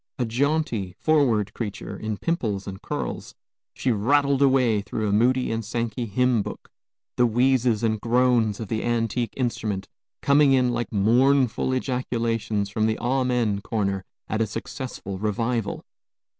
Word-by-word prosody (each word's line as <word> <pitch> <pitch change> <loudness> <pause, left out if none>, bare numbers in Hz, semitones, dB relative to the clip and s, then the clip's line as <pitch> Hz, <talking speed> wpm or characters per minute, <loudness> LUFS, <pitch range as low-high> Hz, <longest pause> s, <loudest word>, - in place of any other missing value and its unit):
A 125 - 0
jaunty, 120 - -1
forward 120 -10 +2
creature, 105 -4 -5
in 110 -1 -4
pimples 110 - -2
and 95 -1 -7
curls, - - -5 0.4
she 130 - 0
rattled 140 +5 +2
away 130 -6 +3
through 110 +1 -3
a - - 0
Moody 125 +5 +2
and 115 0 -2
Sankey 115 +2 -3
hymn 125 +1 +2
book, - - -8 0.5
the 125 - +4
wheezes 120 -1 +2
and 110 -2 0
groans 120 -3 +2
of 110 - -5
the 110 +2 -2
antique 120 -1 -1
instrument 110 -6 -2 0.4
coming 140 -1 +5
in 125 -2 +3
like 120 0 -3
mournful 125 +5 +3
ejaculations 115 -5 -1
from 110 +1 +1
the 110 - 0
amen 125 -4 0
corner 100 -3 -2 0.2
at 110 - -1
a 110 - +1
successful 100 -4 -6
revival. 110 +1 -2
115 Hz, 145 wpm, -24 LUFS, 105-130 Hz, 0.5 s, coming